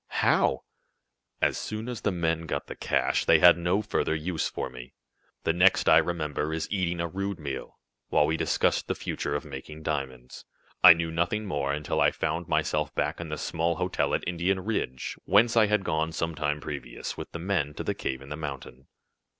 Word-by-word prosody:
"How?" - - +2 0.8
"As - - +2
soon 110 +2 -5
as 125 -2 -5
the 105 - +1
men 85 -2 -1
got 70 -2 -2
the - - -8
cash, - - 0
they 80 - +6
had 90 +2 +8
no 90 +5 0
further 80 - 0
use 80 0 -2
for - - -4
me. 60 0 -11 0.5
The 80 - +2
next 90 +3 +4
I - - +8
remember 75 -3 -2
is 80 0 -2
eating 90 -4 -1
a 85 - 0
rude 100 +2 -3
meal, 70 -3 -6 0.3
while 75 - +4
we 80 +2 0
discussed - - +1
the - - -1
future - - -3
of 75 - -3
making 75 +2 -9
diamonds. 65 -5 -4 0.4
I 90 -2 +12
knew 85 0 -3
nothing 85 +6 -1
more 70 -7 -1
until 75 +1 -1
I - - +6
found 80 +2 -3
myself - - 0
back 75 +3 -1
in 85 - -6
the 75 - -3
small 85 +3 -1
hotel 90 +2 0
at - - -3
Indian 90 +2 0
Ridge, 90 - -3
whence 110 +3 +4
I 110 -2 +5
had 105 -1 +1
gone 80 -2 0
some 80 0 -2
time 75 -1 -2
previous, 70 -6 -6
with - - -8
the - - -5
men, 85 -5 -1
to - - -4
the - - -1
cave 65 0 -4
in 70 - -12
the 75 - -4
mountain." 70 -3 -7
80 Hz, 200 wpm, -27 LUFS, 75-90 Hz, 0.8 s, I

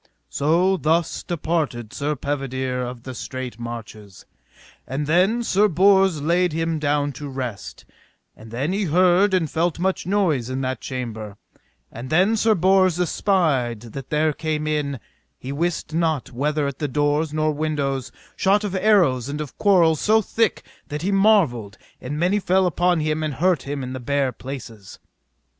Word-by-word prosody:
So 170 +7 +2
thus 165 0 0
departed 155 - -2
Sir 150 +1 -2
Pedivere 130 -2 -3
of 120 -1 -6
the 130 - -7
Straight 125 -1 -6
Marches. 110 -4 -9 0.6
And 140 +3 -3
then 185 +10 +2
Sir 210 -1 +3
Bors 190 -3 +3
laid 175 +1 +2
him 165 0 -1
down 145 -1 0
to 140 +2 -8
rest, 125 -6 -6 0.5
and 110 - -13
then 135 +10 -2
he 200 +1 0
heard 180 +4 +4
and 170 -4 +1
felt 165 +2 -1
much 185 0 -1
noise 170 - +1
in 130 +1 -3
that 130 0 -3
chamber; 110 -6 -6 0.5
and 120 +3 -8
then 185 +8 +3
Sir 220 0 +3
Bors 185 -1 +3
espied 155 - +1
that 135 -2 -7
there 155 0 +1
came 155 0 -2
in, 145 -3 -1 0.4
he 130 - -7
wist 160 +2 -2
not 160 -4 0
whether 150 +4 -1
at 140 -1 -4
the 150 - -1
doors 145 +2 0
nor 155 0 +1
windows, 145 -4 -2 0.2
shot 200 +2 +2
of 205 -3 -3
arrows 180 - +3
and 145 +1 -4
of 150 -3 -6
quarrels 170 -6 +4
so 220 +1 +4
thick 220 +1 0 0.2
that 150 +2 -5
he 195 - 0
marvelled, 195 - +2 0.2
and 140 +4 -5
many 180 +6 +2
fell 190 0 +2
upon 175 -1 +1
him 155 0 -1
and 155 -3 -2
hurt 175 -4 +1
him 140 -1 -3
in 130 0 -5
the 130 - -5
bare 140 +1 0
places. 115 -7 -9
150 Hz, 165 wpm, -22 LUFS, 130-180 Hz, 0.6 s, heard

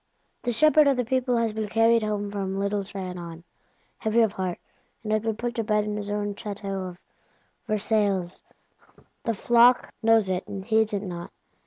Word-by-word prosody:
The 245 - -1
shepherd 305 +4 +5
of 275 -2 +3
the 250 - 0
people 250 0 +1
has 230 -2 0
been 215 -1 -3
carried 225 +1 +4
home 205 -1 -2
from 195 -1 -3
Little 200 0 -1
Trianon, 180 -4 -7 0.6
heavy 220 +1 +2
of 220 -3 +3
heart, 185 -3 -3 0.5
and 215 0 0
been 225 0 -1
put 240 +1 -3
to 230 - -2
bed 210 -1 +1
in 210 0 -3
his 205 -1 -4
own 205 0 -2
Château 200 -3 -5
of 175 0 -13 0.7
Versailles: 205 -4 0 0.8
the 230 - 0
flock 240 +3 +4
knows 225 -2 +4
it, 185 -1 -2
and 195 -1 -6
heeds 220 -1 +2
it 200 0 -1
not. 175 -3 -6
210 Hz, 175 wpm, -26 LUFS, 195-225 Hz, 0.8 s, shepherd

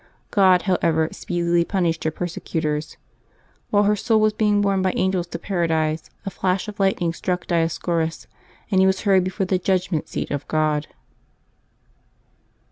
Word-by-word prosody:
God, 185 -4 +4
however, 165 -4 +1
speedily 175 -1 0
punished 170 -3 -1
her - - +3
persecutors. 160 -2 -3 0.7
While 205 0 +3
her 210 +1 +3
soul 220 +2 +2
was 215 0 +3
being 210 -1 +2
borne 200 -2 +1
by 185 0 +1
angels 185 -2 0
to - - -5
Paradise, 160 -4 -1 0.2
a 195 - -3
flash 185 +2 -1
of 210 -1 -8
lightning 190 -4 +1
struck 180 +1 -3
Dioscorus, 165 -1 -1 0.5
and 190 -1 +4
he 190 - +5
was 190 0 +1
hurried 190 -3 +3
before 190 +1 -2
the 185 0 0
judgment 180 -3 0
seat - - -4
of 145 -1 -3
God. 155 -1 0
180 Hz, 150 wpm, -22 LUFS, 165-195 Hz, 0.7 s, he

